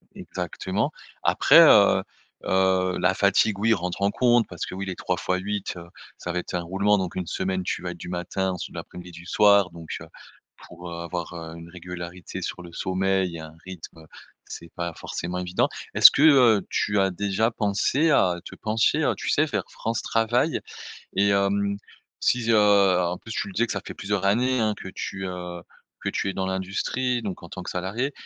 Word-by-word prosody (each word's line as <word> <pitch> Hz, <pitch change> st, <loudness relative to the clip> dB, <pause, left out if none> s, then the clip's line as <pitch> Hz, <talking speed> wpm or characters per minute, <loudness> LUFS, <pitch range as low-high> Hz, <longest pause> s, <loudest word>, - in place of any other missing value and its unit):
Exactement. -, -, -3 dB, 0.3 s
Après, -, -, +6 dB
heu -, -, +6 dB, 0.4 s
heu, 95 Hz, -1 st, +2 dB
la -, -, +3 dB
fatigue, 100 Hz, -3 st, +2 dB
oui 115 Hz, +1 st, +3 dB
rentre 90 Hz, 0 st, -3 dB
en 100 Hz, +1 st, +2 dB
compte, 120 Hz, -2 st, +3 dB
parce 90 Hz, -, -5 dB
que -, -, -8 dB
oui 95 Hz, +1 st, -4 dB
les 95 Hz, -, -4 dB
3 90 Hz, -, -2 dB
fois 90 Hz, +2 st, -1 dB
8 100 Hz, +1 st, -3 dB
heu, 85 Hz, -, -9 dB, 0.3 s
ça -, -, -5 dB
va 90 Hz, -, -1 dB
être 90 Hz, -, -7 dB
un 90 Hz, -, 0 dB
roulement 100 Hz, +4 st, +1 dB
donc 95 Hz, -2 st, -3 dB
1 90 Hz, -2 st, -3 dB
semaine, 95 Hz, +2 st, -2 dB
tu -, -, -3 dB
vas 90 Hz, -1 st, -4 dB
être 85 Hz, -, -9 dB
du 90 Hz, -, -8 dB
matin, 90 Hz, +2 st, -2 dB
ensuite 90 Hz, -, -6 dB
de -, -, -9 dB
l'après-midi, 90 Hz, 0 st, -10 dB
du 85 Hz, 0 st, -12 dB
soir 100 Hz, -2 st, +5 dB
donc 85 Hz, -1 st, -7 dB
heu, -, -, -10 dB, 0.5 s
pour, 90 Hz, 0 st, -11 dB
heu, 85 Hz, 0 st, -6 dB
avoir, 85 Hz, 0 st, -5 dB
heu, 80 Hz, -1 st, -7 dB
une 85 Hz, 0 st, -11 dB
régularité 90 Hz, 0 st, -8 dB
sur 90 Hz, -, -5 dB
le 85 Hz, -1 st, -12 dB
sommeil 95 Hz, -2 st, 0 dB
et -, -, -8 dB
un 80 Hz, 0 st, -10 dB
rythme, 90 Hz, -3 st, -10 dB
heu, 80 Hz, -, -14 dB, 0.4 s
c'est 85 Hz, -, -10 dB
pas 85 Hz, -1 st, -3 dB
forcément 90 Hz, +1 st, -5 dB
évident. 90 Hz, 0 st, 0 dB, 0.2 s
Est-ce -, -, +9 dB
que, 140 Hz, -, +2 dB
heu, 125 Hz, -9 st, +6 dB
tu 105 Hz, -1 st, 0 dB
as 95 Hz, -1 st, +2 dB
déjà 100 Hz, +4 st, 0 dB
pensé 115 Hz, +9 st, +1 dB
à 90 Hz, -11 st, +3 dB
te -, -, -10 dB
pencher, 110 Hz, 0 st, +1 dB
heu, -, -, +2 dB
tu -, -, -4 dB
sais, -, -, +3 dB
vers -, -, -2 dB
France 115 Hz, 0 st, -3 dB
Travail? 120 Hz, +7 st, +1 dB, 0.6 s
Et 100 Hz, +1 st, +4 dB
hem, 100 Hz, 0 st, +1 dB, 0.4 s
si 125 Hz, -, +2 dB
je 115 Hz, 0 st, +1 dB, 0.5 s
en 90 Hz, +1 st, -3 dB
plus 110 Hz, -, -9 dB
tu 100 Hz, -, -2 dB
le 95 Hz, -, -10 dB
disais 115 Hz, -, +2 dB
que -, -, -3 dB
ça 100 Hz, -, -3 dB
fait -, -, -7 dB
plusieurs 100 Hz, 0 st, -2 dB
années 125 Hz, +5 st, +2 dB
hein 110 Hz, -1 st, +1 dB
que -, -, -7 dB
tu, 95 Hz, -1 st, -5 dB
heu, 90 Hz, -1 st, -6 dB, 0.4 s
que -, -, 0 dB
tu -, -, -2 dB
es -, -, -4 dB
dans 95 Hz, -, -2 dB
l'industrie 95 Hz, +7 st, -1 dB
donc 95 Hz, -4 st, -5 dB
en 85 Hz, -, -10 dB
tant 90 Hz, -, -7 dB
que -, -, -5 dB
salarié 105 Hz, +10 st, -2 dB
95 Hz, 210 wpm, -25 LUFS, 90-105 Hz, 0.6 s, Est-ce